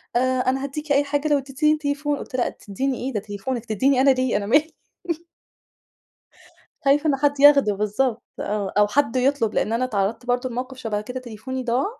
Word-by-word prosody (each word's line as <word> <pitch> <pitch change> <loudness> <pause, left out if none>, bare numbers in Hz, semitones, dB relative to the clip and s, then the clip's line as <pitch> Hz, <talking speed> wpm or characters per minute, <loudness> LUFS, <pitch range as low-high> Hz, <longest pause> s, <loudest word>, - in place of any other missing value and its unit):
آآ - - +4 0.2
أنا 260 +1 0
هادِّيكِ 290 +2 -5
أي 280 +1 +4
حاجة 290 +1 -1
لو 295 -1 +3
ادَّتيني 275 +3 +1
التليفون، 290 -1 -1
قُلت - - -8
لها 250 - +2
لا - - 0
تديني 260 +6 -3
إيه؟! 270 - -4
ده 210 - 0
تليفونِك، 215 +4 -5
تدِّيني 260 +5 +2
أنا 275 - +5
ليه؟ 255 -4 +2
أنا 200 - -3
مالي. 295 +8 +2 2.1
خايفة 290 +3 +3
إن 275 - +3
حد 285 0 0
ياخده 280 -7 +6
بالضبط، 215 +4 -1 0.2
آه 200 -1 -2
أو 210 - +6
حد 255 +1 +1
يطلب 255 -3 +1
لأن 210 - 0
أنا 235 +2 +1
اتعرضت 220 +1 -2
برضه 245 +1 0
لموقف 255 +2 -5
شبه 220 -4 -2
كده 250 +5 -6
تليفوني 255 +2 -6
ضاع، 245 +3 +1
255 Hz, 190 wpm, -23 LUFS, 225-280 Hz, 2.1 s, ياخده